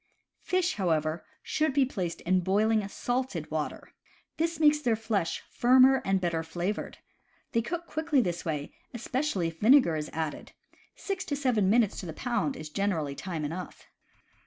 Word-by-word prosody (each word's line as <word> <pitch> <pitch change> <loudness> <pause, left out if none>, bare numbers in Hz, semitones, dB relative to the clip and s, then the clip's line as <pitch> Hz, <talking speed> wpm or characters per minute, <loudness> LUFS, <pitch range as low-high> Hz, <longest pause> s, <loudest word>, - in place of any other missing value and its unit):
Fish, 365 -5 0
however, 160 -4 0 0.2
should 310 -3 0
be 275 -2 +5
placed 185 -9 -4
in 185 +1 +2
boiling 210 +3 +2
salted 245 - -3
water. 155 -1 -4 0.4
This 330 0 -1
makes 300 -1 +5
their 240 -6 +1
flesh 215 -6 -2
firmer 260 +2 +5
and 195 0 +1
better 170 -3 -1
flavored. 175 +5 -4 0.5
They 230 - +2
cook 340 +8 -4
quickly 315 -3 0
this 175 -7 -1
way, 150 -4 -3 0.2
especially 240 - -1
if 165 0 -14
vinegar 235 - +5
is 155 -1 -3
added; 160 -1 -4 0.4
six 390 -1 -4
to 290 - -2
seven 245 -9 +2
minutes 220 -1 +3
to 180 - -6
the 160 - -5
pound 245 - -1
is 155 - -7
generally 160 -5 -1
time 160 0 -4
enough. 175 +5 -6
205 Hz, 160 wpm, -29 LUFS, 170-265 Hz, 0.5 s, be